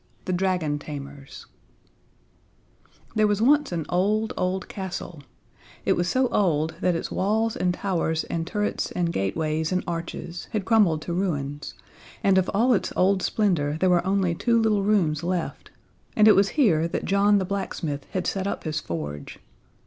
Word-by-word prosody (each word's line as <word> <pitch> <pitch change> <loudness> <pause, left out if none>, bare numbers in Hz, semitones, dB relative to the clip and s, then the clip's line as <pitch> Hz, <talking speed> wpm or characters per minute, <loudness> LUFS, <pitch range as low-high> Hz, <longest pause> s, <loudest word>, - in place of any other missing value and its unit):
The 185 - -1
Dragon 180 -5 0
Tamers 140 -2 -9 1.7
There 215 -1 +3
was 205 -1 +1
once 290 +4 +3
an 165 -3 -2
old, 210 +5 +1
old 185 +1 -1
castle 180 -4 -6 0.6
it - - +4
was 175 0 0
so 260 +6 +2
old 160 -5 +1
that 180 -1 +2
its 165 - -4
walls 220 +3 0
and 180 - +1
towers 170 -4 -1
and 165 0 -3
turrets 210 +2 -1
and 170 -1 -1
gateways 155 - -1
and 185 0 0
arches 170 0 -5
had 210 -3 -1
crumbled 190 -9 +3
to 170 - -4
ruins, 145 -6 -3 0.5
and 190 -1 +5
of 185 - -1
all 240 +5 +3
its 205 - 0
old 190 +1 +3
splendor 165 -10 0
there 185 +1 +3
were 175 -1 +3
only 190 -2 +1
two 230 +6 +2
little 215 -2 +2
rooms 185 -7 +2
left; 175 0 -3 0.5
and 215 0 +6
it 215 - +8
was 195 0 +4
here 165 - +4
that - - -3
John 200 +1 +4
the 190 - 0
blacksmith 165 -7 -4
had 185 -1 -3
set 195 0 -1
up - - -3
his 155 -1 -2
forge. 75 - -6
180 Hz, 165 wpm, -25 LUFS, 160-200 Hz, 1.7 s, it